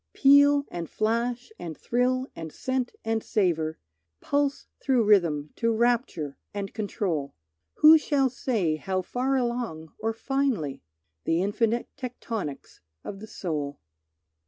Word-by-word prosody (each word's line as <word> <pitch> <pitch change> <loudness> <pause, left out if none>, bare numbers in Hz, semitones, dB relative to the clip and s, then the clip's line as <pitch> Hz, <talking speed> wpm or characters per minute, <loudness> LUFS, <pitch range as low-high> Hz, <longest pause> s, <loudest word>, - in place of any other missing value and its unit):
Peal 285 +1 +6
and 170 -2 -5
flash 235 - -1
and 160 -3 -6
thrill 255 +2 +1
and 165 -1 -7
scent 260 - -2
and 225 0 0
savour 165 -6 0 0.4
Pulse 285 0 0 0.2
through 255 -4 +3
rhythm 170 -8 +3
to 230 0 +2
rapture, 225 - 0 0.2
and 200 -1 -4
control, 190 -9 -2 0.4
Who 315 +1 +8
shall 275 -4 +1
say 205 -11 0
how 185 +3 -2
far 255 +7 0
along 235 - -2
or 225 +1 0
finely? 230 - -1 0.4
The 165 +2 +2
infinite 230 +3 0
tectonics 230 - -5 0.2
of 195 - -7
the 215 - -9
soul. 150 -9 -4
225 Hz, 125 wpm, -27 LUFS, 170-255 Hz, 0.4 s, Who